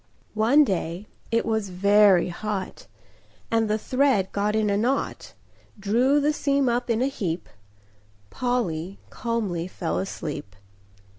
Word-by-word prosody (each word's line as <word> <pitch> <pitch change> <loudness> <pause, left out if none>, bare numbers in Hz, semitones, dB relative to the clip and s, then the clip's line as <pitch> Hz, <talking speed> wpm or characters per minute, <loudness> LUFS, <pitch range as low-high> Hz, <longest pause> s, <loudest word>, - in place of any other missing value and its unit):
One 230 +8 +5
day 180 - -2 0.2
it 230 0 +1
was 220 -3 -1
very 200 0 +4
hot, 210 - -5 0.6
And 225 -1 +2
the 215 - +2
thread 255 -5 +1
got 205 +1 0
in 215 -1 +1
a - - +2
knot, 245 +7 -2 0.4
Drew 240 +8 +2
the 295 +1 +2
seam 280 -2 +1
up 245 +1 0
in 230 +1 +1
a - - +2
heap— 180 -10 -3 0.8
Polly 195 -8 -2
calmly 210 -8 -2
fell 175 -2 -3
asleep. 150 - -5
215 Hz, 130 wpm, -25 LUFS, 190-245 Hz, 0.8 s, One